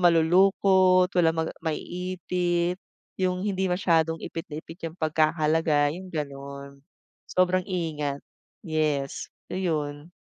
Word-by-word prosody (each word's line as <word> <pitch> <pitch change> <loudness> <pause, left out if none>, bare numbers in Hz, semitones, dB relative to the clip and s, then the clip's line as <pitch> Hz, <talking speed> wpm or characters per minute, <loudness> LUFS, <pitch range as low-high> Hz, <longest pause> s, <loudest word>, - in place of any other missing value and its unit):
malulukot, 185 +2 +4
walang 165 -2 +3
maga 160 0 -1
maiipit 180 +1 -2 0.4
yung 185 0 0
hindi 190 -2 0
masyadong 165 -3 +2
ipit 165 +2 -6
na 150 - -6
ipit 165 +2 -12
yung 160 - -15
pagkakalagay, 155 -2 +2
yung 190 - -10
gano'n 140 -2 -6 0.5
sobrang, 185 0 +2
ingat, 155 -6 -2 0.4
yes, 155 -4 -1 0.2
ayun. 155 -4 -2
165 Hz, 105 wpm, -26 LUFS, 155-180 Hz, 0.5 s, malulukot